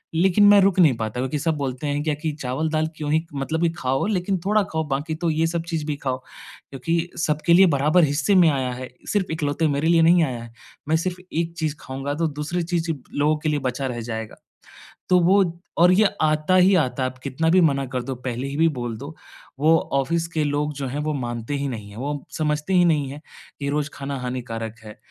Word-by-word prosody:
लेकिन 190 +4 +4
मैं 205 0 +8
रुक 195 -1 +3
नहीं 155 -7 +6
पाता 110 +2 -3
क्योंकि 130 +3 -2
सब 160 +1 0
बोलते 135 0 -3
हैं 145 +1 -1
क्या 155 - 0
कि 155 +1 -3
चावल-दाल 155 +5 -1
क्यों 150 -1 -3
ही 160 +1 +1
मतलब 155 +4 -2
कि 170 - +3
खाओ 130 +2 0
लेकिन 190 -2 0
थोड़ा 210 +1 +3
खाओ 160 -5 -3
बाकी 145 +4 -2
तो 170 +1 -1
ये 160 +1 +1
सब 165 0 -2
चीज़ 160 -3 -2
भी 150 -1 -2
खाओ। 130 -3 -2 0.5
क्योंकि 165 +6 -2
सबके 155 +1 +1
लिए 190 +2 +8
बराबर 155 +3 +3
हिस्से 150 +7 +2
में 175 -3 +6
आया 130 -3 -1
है 125 +1 -7 0.2
सिर्फ़ 200 -5 0
इकलौते 160 0 0
मेरे 145 +2 0
लिए 170 -1 +5
नहीं 170 +1 +5
आया 125 -6 -3
है। 115 - -11 0.4
मैं 160 - +4
सिर्फ़ 180 +2 -3
एक 165 +1 -1
चीज़ 155 -3 -1
खाऊँगा 135 +2 -4
तो 165 0 0
दूसरी 150 +4 -3
चीज़ 170 -1 -1 0.2
लोगों 150 +2 +2
के 155 +1 -2
लिए 150 -1 0
बचा 130 +1 -2
रह 120 -2 -4
जाएगा। 110 -1 -5 0.7
तो 180 - +5
वो 195 +3 +5 0.3
और 175 +2 +6
ये 210 +3 +4 0.2
आता 155 +4 +2
ही 185 +2 +6
आता 130 -6 +1
है 130 - +1
आप 130 - -15
कितना 145 +4 0
भी 185 +2 +5
मना 140 -4 +2
कर 125 - -1
दो 135 - -4
पहले 125 +1 -4
ही 140 - -5
भी 165 +1 +4
बोल 120 -2 -3
दो। 140 +6 -9 0.4
वो 160 +2 +5 0.2
ऑफ़िस 165 +5 0
के 155 -1 +1
लोग 145 +1 -1
जो 135 -1 -4
हैं 140 +4 -4
वो 155 0 -1
मानते 120 -1 -4
ही 140 0 -2
नहीं 105 -5 -7
हैं, 100 - -12
वो 145 +3 -4
समझते 150 +3 -1
ही 180 -1 +5
नहीं 150 -5 +1
है 145 +2 -9 0.4
कि 140 - -2
रोज़ 150 +1 -1
खाना 140 0 -5
हानिकारक 120 -3 -5
है। 105 0 -11
150 Hz, 230 wpm, -23 LUFS, 135-165 Hz, 0.7 s, मैं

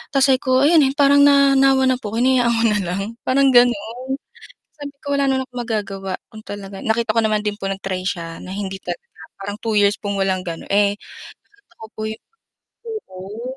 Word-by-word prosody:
tas 270 -1 +5
sabi 260 - +3
ko, 260 +1 +2
ayun, 320 +1 +6 0.2
parang 285 0 +5
nanawa 275 -1 +5
na 255 - +2
po 210 0 -5
hinayaan 245 0 +3
ko 230 - +1
na 210 - +1
lang, 180 +2 -3 0.3
parang 270 +1 +4
gano'n. 245 +1 +2 0.6
Sabi 290 -1 -8
ko, 285 - -3
wala 280 -1 +1
naman 265 0 +1
akong 250 -1 -7
magagawa 195 -4 -4 0.2
kung 215 0 -11
talaga 200 -1 -8
nakita 225 0 0
ko 230 - +5
naman 215 -1 +1
din 210 - 0
po 195 - -3
nag-try 195 -1 -3
siya 165 -3 -4
na 185 - -8
hindi 195 -1 -4
talaga, - - -6 0.4
parang 205 +1 -5
2 225 -1 -1
years 205 0 +3
pong 200 -1 -3
walang 190 -1 +1
gano'n. 165 -1 -6
Eh, 200 0 +3
sa - - -16 0.6
totoo 220 - -10
po - - -10
'yun 220 0 -7 0.9
oo. 210 +8 -8
220 Hz, 195 wpm, -20 LUFS, 200-265 Hz, 0.9 s, ayun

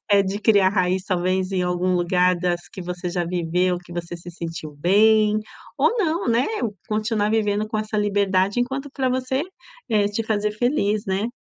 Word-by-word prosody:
é 200 -1 +6
de 195 +1 -3
criar 205 -4 +4
raiz, 185 -1 +1
talvez, 185 0 0
em 185 -1 +1
algum 180 +1 0
lugar 180 +1 +2
das 175 0 -1
que 185 - -7
você 180 0 -4
já 175 0 -1
viveu, 180 +1 0
que 175 -1 -14
você 175 0 -5
se 175 +1 -10
sentiu 165 -3 -7
bem, 215 +4 +4 0.4
ou 480 - +3
não, 335 - 0
né, 235 +3 +2 0.2
ou 215 -3 -2
continuar 215 -1 0
vivendo 215 -1 +1
com 215 0 -3
essa 215 0 -3
liberdade 200 +1 +1
enquanto 270 +3 -3
pra 265 -2 0
você, 260 +2 -1 0.5
é 210 -3 +2
te 205 +2 -2
fazer 210 -1 -1
feliz, 215 -3 0
né. 195 +3 0
200 Hz, 185 wpm, -22 LUFS, 180-215 Hz, 0.5 s, é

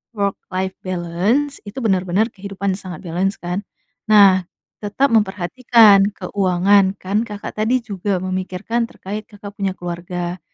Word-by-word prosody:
work-life 190 -2 -2
balance, 185 +11 -1
itu 205 - -9
bener-bener 190 +2 +1
kehidupan 200 0 -3
sangat 185 -1 -8
balance 185 +4 -1
kan, 180 +3 -3 0.5
nah, 195 -4 +6 0.3
tetap 230 +6 0
memperhatikan 210 0 +4
keuangan, 195 0 +2
kan 200 +4 -1
Kakak 210 -3 -6
tadi 220 +4 +1
juga 200 -2 -2
memikirkan 185 +5 -2
terkait 210 +3 -7
Kakak 205 -1 -10
punya 195 -2 -3
keluarga. 175 0 -5
195 Hz, 120 wpm, -20 LUFS, 185-210 Hz, 0.5 s, nah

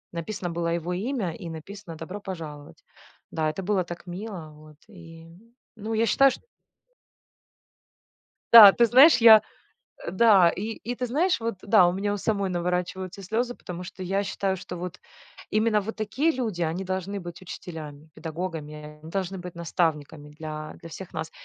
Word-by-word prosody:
Написано 175 +1 -4
было 170 0 -2
его 170 +1 -3
имя 205 -2 -2
и 170 - -6
написано 165 +1 -9
"Добро 185 +6 -7
пожаловать". 155 -6 -8 0.5
Да, 155 -1 0
это 190 +5 -5
было 190 -1 +1
так 175 +1 -9
мило, 180 -3 -7
вот, 155 0 -16
и 165 -4 -13 0.5
Ну, 220 0 -5
я 225 +1 +2
считаю, 275 +5 +5
шт - - -9 2.1
Да, 215 -4 +12
ты 235 - +4
знаешь, 265 +8 +7
я. 225 -3 +9 0.6
Э, - - -4
да, 190 -4 +6
и 180 - -5
и, 245 +3 -6
ты 250 - -3
знаешь, 320 +8 +1
вот, 230 -1 -3
да, 200 -4 +5
у - - +2
меня 200 +3 -2
у - - -2
самой 200 -2 -1
наворачиваются 180 +2 -3
слезы, 235 +5 -2
потому 180 0 -8
что, 185 +1 -8
я 195 +2 -1
считаю, 195 -1 -2
что 180 0 -8
вот 180 +1 -7 0.5
именно 215 0 +2
вот 220 +3 -6
такие 225 +9 0
люди- 225 - -3
они 170 +3 -1
должны 190 +1 -3
быть 175 -1 -9
учителями, 155 -4 -9
педагогами, 160 -2 -6 0.3
они 160 +1 -11
должны 190 -1 -3
быть 180 -1 -9
наставниками 160 -3 -2
для 155 0 -7
для 165 - -11
всех 185 +3 -9
нас. 160 - -5
185 Hz, 170 wpm, -26 LUFS, 165-210 Hz, 2.1 s, Да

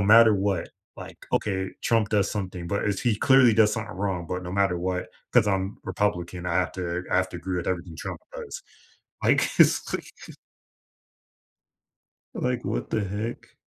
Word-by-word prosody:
no - - +2
matter 110 +2 +7
what, 95 -3 0 0.3
like - - -10
okay, 95 -2 0
Trump 115 -2 +2
does 100 -2 +2
something, 95 -4 -4
but 100 +3 -1
if 100 -1 -1
he 120 -4 +1
clearly 130 0 +6
does 105 -1 +5
something 110 -4 -4
wrong 95 -4 -2
but 90 0 -3
no 90 0 -6
matter 95 -3 +2
what, 90 +1 -2 0.2
'cause 120 -4 +5
I'm 95 0 -1
Republican, 90 -3 -2
I 85 - -1
have 90 -2 +1
to 90 -1 -3
I - - +3
have 95 0 +2
to - - -6
agree 90 +1 -3
with 85 - -4
everything 85 -3 -3
Trump - - -6
does. - - -7 0.6
Like, - - +4
it's - - +4
like - - -5 2.2
like, 125 -1 -1
what - - -3
the 110 -2 0
heck? 105 +5 -5
95 Hz, 175 wpm, -26 LUFS, 90-105 Hz, 2.2 s, matter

